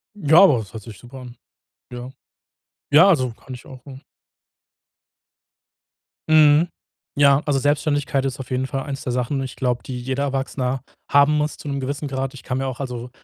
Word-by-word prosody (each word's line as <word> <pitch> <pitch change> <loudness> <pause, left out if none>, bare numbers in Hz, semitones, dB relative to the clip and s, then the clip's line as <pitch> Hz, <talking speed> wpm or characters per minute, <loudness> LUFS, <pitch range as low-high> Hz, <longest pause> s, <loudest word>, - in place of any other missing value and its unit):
Ja, 160 -3 +5
aber 150 -10 +6
das 105 -3 -8
hört 110 -2 -8
sich 105 -3 -11
super 125 +5 -12
an. 125 -1 -11 0.6
Ja. 125 +1 -7 0.8
Ja, 160 +6 +7
also 130 -9 +2
kann 130 +3 -12
ich 125 - -11
auch, 130 -2 -13
mhm 135 -2 -11 2.3
Mhm. 155 +1 +5 0.5
Ja, 140 0 +4
also 145 -2 +1
Selbstständigkeit 145 -1 0
ist 135 -1 -3
auf 130 - -8
jeden 130 +1 -1
Fall 135 +1 -4
eins 140 -2 -6
der 125 - -3
Sachen 125 +3 -1
und 135 - -2
ich 130 - -8
glaube, 125 -2 -1
die 125 -2 -6
jeder 130 +2 -3
Erwachsene 135 -1 -2 0.3
haben 145 +2 +4
muss 150 0 -1
zu - - -8
'nem 140 -1 -3
gewissen 140 +2 -4
Grad. 135 -1 -3
Ich 140 - -12
kann 125 - -3
mir 135 - -2
auch 130 -1 -5
also 125 -2 -5
135 Hz, 190 wpm, -21 LUFS, 125-145 Hz, 2.3 s, Ja